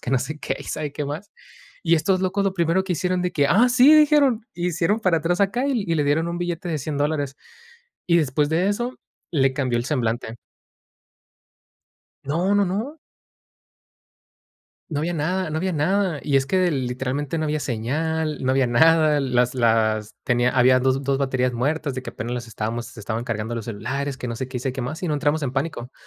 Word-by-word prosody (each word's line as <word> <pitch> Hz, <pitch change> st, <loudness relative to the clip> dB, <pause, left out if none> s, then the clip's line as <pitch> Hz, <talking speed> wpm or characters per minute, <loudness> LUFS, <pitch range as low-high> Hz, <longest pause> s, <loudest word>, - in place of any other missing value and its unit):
que 125 Hz, -, -5 dB
no 130 Hz, -, +4 dB
sé 150 Hz, +4 st, -5 dB
qué -, -, -3 dB
y -, -, -9 dB
sabe 150 Hz, -2 st, -4 dB
qué 150 Hz, -, -4 dB
más. 155 Hz, +8 st, -6 dB, 0.5 s
Y 170 Hz, 0 st, +5 dB
estos 185 Hz, +4 st, +1 dB
locos 195 Hz, +2 st, 0 dB
lo 195 Hz, -1 st, 0 dB
primero 170 Hz, +1 st, +2 dB
que 180 Hz, -2 st, -1 dB
hicieron 180 Hz, +2 st, -1 dB
de 180 Hz, -, 0 dB
que: 145 Hz, -3 st, +2 dB
“Ah, 230 Hz, +7 st, +5 dB
sí”, 255 Hz, +5 st, +6 dB
dijeron. 280 Hz, -7 st, +4 dB
Y 175 Hz, +1 st, -1 dB
hicieron 180 Hz, +6 st, 0 dB
para 180 Hz, -6 st, +2 dB
atrás 175 Hz, +4 st, -1 dB
acá 240 Hz, +8 st, 0 dB
y 245 Hz, -8 st, 0 dB
y 165 Hz, -, 0 dB
le 145 Hz, -, +1 dB
dieron 160 Hz, +4 st, +1 dB
un 170 Hz, 0 st, -3 dB
billete 175 Hz, 0 st, -3 dB
de 155 Hz, -, -1 dB
$100 145 Hz, +2 st, -4 dB
dólares. 145 Hz, -2 st, -1 dB, 0.7 s
Y 170 Hz, -1 st, +4 dB
después 145 Hz, 0 st, +1 dB
de 175 Hz, +5 st, +2 dB
eso, 240 Hz, +5 st, -2 dB, 0.4 s
le 135 Hz, -4 st, +3 dB
cambió 130 Hz, -4 st, 0 dB
el 120 Hz, -, -2 dB
semblante. 120 Hz, -4 st, -2 dB, 1.9 s
No, 170 Hz, +8 st, 0 dB
no, 205 Hz, -, +4 dB
no. 215 Hz, -, -3 dB, 2.0 s
No 145 Hz, -, -1 dB
había 170 Hz, +3 st, -1 dB
nada, 175 Hz, +3 st, -1 dB
no 155 Hz, -, -1 dB
había 185 Hz, +1 st, -1 dB
nada. 175 Hz, +1 st, +1 dB
Y 145 Hz, -, -2 dB
es 135 Hz, 0 st, +3 dB
que 190 Hz, -, 0 dB
de 180 Hz, -3 st, +2 dB
literalmente 135 Hz, +4 st, -2 dB
no 155 Hz, -, -1 dB
había 150 Hz, 0 st, -1 dB
señal, 150 Hz, +6 st, -2 dB
no 130 Hz, -, +1 dB
había 130 Hz, -1 st, +3 dB
nada. 155 Hz, +4 st, +4 dB
Las 125 Hz, -1 st, +1 dB
las 110 Hz, -3 st, +1 dB
tenía 125 Hz, 0 st, +2 dB
habían 130 Hz, 0 st, +4 dB
dos 130 Hz, +1 st, +2 dB
dos 135 Hz, 0 st, +1 dB
baterías 130 Hz, -2 st, 0 dB
muertas, 140 Hz, +3 st, -1 dB
de 130 Hz, -, -4 dB
que -, -, -6 dB
apenas 120 Hz, +2 st, -5 dB
las 120 Hz, -1 st, -5 dB
estábamos 115 Hz, +2 st, -4 dB
se 125 Hz, -2 st, -13 dB
estaban 110 Hz, +2 st, -3 dB
cargando 115 Hz, -1 st, -3 dB
los 115 Hz, -1 st, -5 dB
celulares, 130 Hz, +6 st, -3 dB
que 125 Hz, -, -6 dB
no 115 Hz, -, -3 dB
sé 130 Hz, +2 st, -5 dB
qué, 130 Hz, -, -6 dB
y -, -, -3 dB
sé 130 Hz, 0 st, -2 dB
qué 130 Hz, -, -5 dB
más. 155 Hz, +7 st, -4 dB
Y -, -, -1 dB
no 155 Hz, -, 0 dB
entramos 145 Hz, +1 st, 0 dB
en 125 Hz, -, -2 dB
pánico. 135 Hz, -3 st, -3 dB
150 Hz, 215 wpm, -23 LUFS, 125-175 Hz, 2.0 s, sí